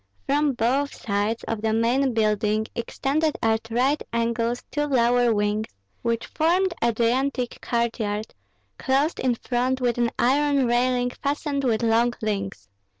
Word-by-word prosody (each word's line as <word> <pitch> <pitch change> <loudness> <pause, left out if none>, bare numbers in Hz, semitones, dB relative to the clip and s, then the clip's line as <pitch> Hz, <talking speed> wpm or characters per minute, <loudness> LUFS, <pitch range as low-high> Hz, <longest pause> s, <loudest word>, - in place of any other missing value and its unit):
From 290 0 +2
both 260 +5 0
sides 205 +2 -2
of 225 -2 -3
the 220 0 0
main 245 +4 +2
building 215 0 +1
extended 285 +6 -1
at 225 0 +1
right 260 +6 +1
angles 235 +1 -1
two 295 0 0
lower 245 -3 +3
wings, 210 0 0 0.3
which 230 -1 -1
formed 355 +3 +1
a 235 - +3
gigantic 245 +2 0
courtyard, 225 -3 -2 0.5
closed 275 +5 +1
in 250 -2 +1
front 255 +2 -1
with 245 -2 0
an 240 -1 +2
iron 280 +1 +2
railing 245 +1 +1
fastened 280 +1 -2
with 235 -3 +1
long 235 +1 +2
links. 195 - -3
240 Hz, 140 wpm, -24 LUFS, 225-270 Hz, 0.5 s, lower